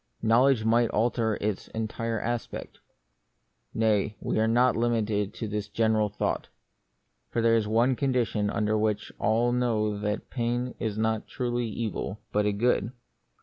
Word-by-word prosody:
Knowledge 115 +1 +4
might 115 +1 +3
alter 110 -1 +1
its 105 -2 -2
entire 110 +1 -2
aspect. 120 +1 -4 0.9
Nay, 110 -1 +1
we - - -1
are 110 - +3
not 125 +3 +3
limited 110 -3 0
to 110 - -4
this 105 -1 -3
general 110 -1 +2
thought. 105 - -2 0.8
For - - -2
there 115 0 +4
is 110 -2 +1
one 120 +4 +3
condition 120 -6 0
under 110 0 0
which 105 -1 0
all 115 +3 +2
know 110 -4 0
that 105 +1 -3
pain 120 0 -1
is 110 -3 -2
not 110 0 0
truly 120 -2 -2
an 110 - -7
evil, 110 -2 -3
but 105 0 +2
a - - +2
good. 115 +1 +1
110 Hz, 150 wpm, -27 LUFS, 105-120 Hz, 0.9 s, Knowledge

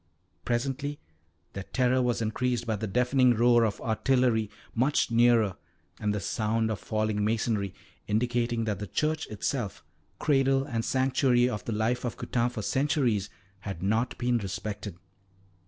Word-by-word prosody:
Presently 135 +4 -2 0.5
their 100 - -4
terror 130 +5 +1
was 120 -2 0
increased 120 +2 -1
by 110 -2 0
the 110 +2 -3
deafening 125 +3 +3
roar 120 +1 +5
of 110 -3 -1
artillery 115 -1 +1 0.2
much 130 +1 +1
nearer 115 -4 +4 0.4
and 105 -1 0
the 105 - -1
sound 110 +3 0
of 105 - -3
falling 110 -1 -1
masonry, 110 -3 0 0.3
indicating 120 +1 0
that 105 -3 -2
the 105 - -5
church 155 - -1
itself, 110 0 -3 0.3
cradle 135 -2 +2
and 115 -5 -3
sanctuary 130 -1 +2
of 105 -5 -4
the - - -3
life 110 +3 0
of 120 - -3
Coutane 120 0 0
for 110 -3 -5
centuries, 130 -6 +1 0.3
had 95 -3 -6
not 110 +5 0
been 120 -1 +1
respected. 100 -1 -5
115 Hz, 145 wpm, -28 LUFS, 110-125 Hz, 0.5 s, roar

